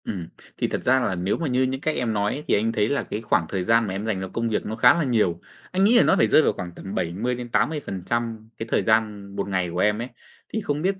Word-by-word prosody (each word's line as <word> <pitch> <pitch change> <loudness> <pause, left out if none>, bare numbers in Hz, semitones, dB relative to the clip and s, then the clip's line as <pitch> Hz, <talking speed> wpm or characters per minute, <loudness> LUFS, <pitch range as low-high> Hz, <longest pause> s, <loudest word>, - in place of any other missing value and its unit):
Ừm. 90 -5 -4 0.3
Thì - - 0
thật - - -3
ra 130 +1 +4
là 100 -7 -1
nếu 90 +3 -1
mà 165 - -2
như 130 0 +2
những 130 +1 -2
cách 155 0 -1
em 115 -3 -1
nói 105 +8 -1
thì - - +2
anh 110 +2 +2
thấy 105 -2 +1
là 140 - 0
cái 105 - -5
khoảng 95 -6 +1
thời 95 -2 -2
gian 115 +3 +3
mà 95 - -3
em 100 +3 -4
dành 105 -4 -1
cho 95 - -4
công 115 0 -1
việc 110 - -1
nó 110 - -3
khá 120 +2 +6
là 170 - 0
nhiều, 110 - +1 0.3
anh 185 +1 +1
nghĩ 230 +4 +5
là - - +7
nó - - +4
phải - - +3
rơi - - +6
vào - - +2
khoảng 90 -1 -6
tầm 95 - -7
70%-80% 115 - -2
cái 115 - -5
thời - - +2
gian 105 -3 0
1 100 - -2
ngày 95 -3 -1
của 90 - -2
em 105 +2 +2
ấy. 120 - -4 0.5
Thì 220 - -1
không 150 -6 -2
biết 190 +2 0
115 Hz, 280 wpm, -24 LUFS, 100-130 Hz, 0.5 s, là